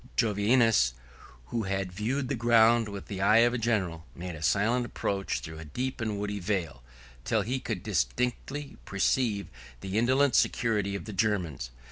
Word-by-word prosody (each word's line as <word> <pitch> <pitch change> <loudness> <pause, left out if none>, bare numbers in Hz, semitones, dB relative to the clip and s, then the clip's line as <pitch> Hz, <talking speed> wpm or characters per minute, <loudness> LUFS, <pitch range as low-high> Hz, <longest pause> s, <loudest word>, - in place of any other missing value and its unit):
Jovinus, 110 - +3 0.6
who 115 -3 -2
had 95 -1 -2
viewed 120 +8 -2
the 140 - -1
ground 115 -2 +4
with 100 -1 -7
the 95 -2 -5
eye 110 +4 +6
of 120 - +1
a 125 - -1
general, 95 -8 -1
made 90 0 -6
a 80 - -9
silent 105 +10 +2
approach 100 -4 -2
through 80 -1 -8
a - - -7
deep 130 - -4
and 105 -2 -2
woody 105 0 -3
vale, 90 - -2 0.4
till 110 - +1
he 125 +5 -2
could 110 -8 -4
distinctly 125 - -2
perceive 100 +1 0 0.4
the 95 +3 -1
indolent 130 +3 +3
security 105 -4 +1
of 100 - -5
the 105 - -7
Germans. 90 - -1
105 Hz, 165 wpm, -29 LUFS, 95-120 Hz, 0.6 s, eye